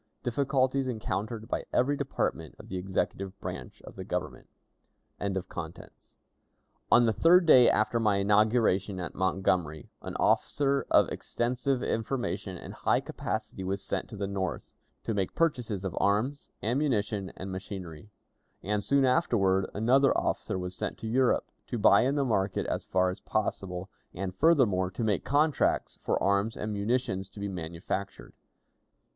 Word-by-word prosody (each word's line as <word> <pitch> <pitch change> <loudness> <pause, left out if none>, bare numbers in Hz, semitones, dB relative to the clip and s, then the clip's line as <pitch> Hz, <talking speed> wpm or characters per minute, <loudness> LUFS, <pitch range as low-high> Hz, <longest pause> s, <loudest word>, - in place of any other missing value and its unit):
Difficulties 135 +1 +1
encountered 110 -1 -3
by - - -2
Every 140 +4 +2
Department 130 - -2
of - - -13
the 95 - -3
Executive 95 +1 -3
Branch - - -7
of - - -11
the - - -5
Government. - - -4 0.7
On 100 -1 -1 1.7
the 110 - +2
third 175 - +5
day 125 -6 +8
after 110 +2 +2
my 105 -3 +2
inauguration 100 -1 +2
at 90 - -5
Montgomery, 90 -4 -1
an - - -7
officer 140 -1 +1
of - - +5
extensive 125 +2 -1
information 110 -5 -2
and - - -9
high - - +1
capacity 95 - -4
was 95 +1 -2
sent - - -3
to 110 - -8
the 100 - -2
North, 95 -2 -4 0.3
to 115 - -2
make 95 -3 -2
purchases 120 - 0
of 95 - -3
arms, 115 +8 0
ammunition, 110 -6 0
and 95 +1 -6
machinery; 95 -2 -7 0.5
and 105 +2 -1
soon 140 +2 +3
afterward 100 - +2
another 130 +6 +4
officer - - -1
was 90 0 -3
sent - - -3
to 110 - -6
Europe, 125 +2 +2 0.2
to 120 - -3
buy 100 -2 +6
in 135 +3 +1
the 140 -2 +1
market 100 -5 0
as - - -3
far 95 -1 +2
as 90 - -8
possible, 95 -4 -2 0.3
and, 95 0 -3
furthermore, 110 - +3
to 95 +5 -4
make 105 -3 +1
contracts 150 +2 +1
for - - 0
arms 100 +3 +1
and 105 0 -3
munitions 100 -2 -1
to - - -12
be 100 - -2
manufactured. 90 +2 -5
105 Hz, 150 wpm, -29 LUFS, 95-125 Hz, 1.7 s, day